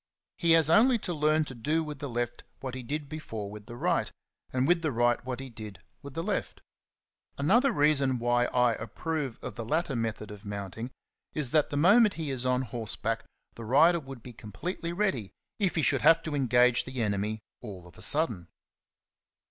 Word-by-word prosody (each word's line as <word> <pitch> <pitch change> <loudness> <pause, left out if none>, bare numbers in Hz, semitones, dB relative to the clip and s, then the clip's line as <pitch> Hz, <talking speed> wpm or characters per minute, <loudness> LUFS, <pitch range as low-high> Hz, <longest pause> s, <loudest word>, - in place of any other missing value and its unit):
He 170 -2 +4
has 165 -2 +5
only 235 +9 +5
to 180 -5 -3
learn 155 0 +2
to 135 - -7
do 150 +7 0
with 150 -3 -7
the 140 - -4
left 120 0 -3 0.2
what 130 -2 -5
he 130 - -5
did 145 +4 -4
before 115 -10 -6
with 105 0 -10
the 120 - -8
right, - - 0 0.4
and 130 +1 +1
with 175 -1 +3
the 155 -3 0
right 120 0 +2
what 125 0 -4
he 135 - -6
did 110 -5 -9 0.2
with 140 -1 -10
the 165 - -2
left. 205 +2 -2 0.8
Another 230 - +4
reason 145 - +2
why 120 +1 +2
I 125 -1 +2
approve 135 +4 -4
of - - -5
the 115 - -5
latter 150 +4 -1
method 110 -2 -3
of 105 0 -10
mounting 100 +3 -5 0.5
is 140 -5 -1
that 155 -2 +3
the 145 - -3
moment 205 +7 +5
he 155 -4 -3
is 130 -1 -1
on 125 +1 +2
horseback 115 -1 -3 0.3
the 115 - -9
rider 155 +9 +5
would 135 -5 -10
be 125 - -10
completely 170 - -5
ready, 170 - -1 0.3
if 195 -3 +1
he 160 - +1
should - - +3
have 165 0 +6
to 160 - -4
engage 125 -3 +3
the 130 0 -6
enemy 105 +1 -1 0.2
all 95 -7 -9
of 85 -3 -15
a - - -13
sudden. 115 - -1
130 Hz, 195 wpm, -29 LUFS, 115-160 Hz, 0.8 s, have